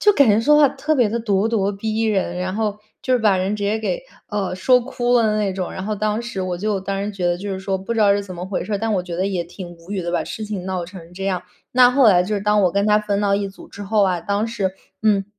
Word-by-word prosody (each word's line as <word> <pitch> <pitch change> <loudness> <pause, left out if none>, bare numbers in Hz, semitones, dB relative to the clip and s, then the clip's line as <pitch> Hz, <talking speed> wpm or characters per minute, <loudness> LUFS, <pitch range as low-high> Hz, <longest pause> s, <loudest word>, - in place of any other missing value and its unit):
就 415 - +5
感 280 - +4
觉 210 +2 +4
说 295 +5 +5
话 295 -2 +6
特 290 +3 -1
别 240 -4 +3
的 235 +2 -2
咄 205 -1 +1
咄 205 -3 +1
逼 220 +2 -2
人， 195 -5 0
然 185 +1 -2
后 210 -1 -1 0.2
就 255 - +1
是 - - +3
把 210 -3 +4
人 190 +3 0
直 205 - -5
接 210 +2 0
给， - - -2 0.3
呃， 200 -3 -2
说 250 +6 +4
哭 245 -1 0
了 235 - +4
的 215 -1 +1
那 200 -2 0
种。 185 -1 -4
然 190 - -5
后 215 - -1
当 215 +2 -1
时 235 -6 -4
我 180 -1 -3
就 205 -1 -1
当 195 +1 -3
时 210 - -4
觉 185 -2 -4
得 175 0 +1
就 205 +1 -5
是 190 - -4
说 190 0 -2
不 215 +5 -4
知 225 - 0
道 205 -1 +5
是 200 0 0
怎 185 -2 -8
么 175 +1 -6
回 190 0 -3
事 215 - -5
儿， 200 - 0
但 225 0 -1
我 180 - 0
觉 180 -1 -6
得 185 - 0
也 180 -3 -2
挺 180 +1 -9
无 170 +4 -11
语 190 -3 -2
的， 170 - -3
把 175 - 0
事 220 - -6
情 200 -3 -5
闹 185 -2 -2
成 175 -2 -12
这 195 +1 -5
样。 185 -2 -1 0.3
那 250 0 +6
后 255 -3 +5
来 180 -3 +5
就 210 +2 -2
是 200 - -1
当 210 0 +2
我 180 - +2
跟 200 +1 +1
他 210 0 +5
分 205 -1 -1
到 200 -1 +2
一 200 -1 -2
组 195 - -14
之 205 - -9
后 205 +1 +2
啊， 180 -3 0
当 205 +4 -1
时 200 -5 -2 0.3
嗯， 205 -3 +3
205 Hz, 330 characters per minute, -21 LUFS, 190-220 Hz, 0.3 s, 话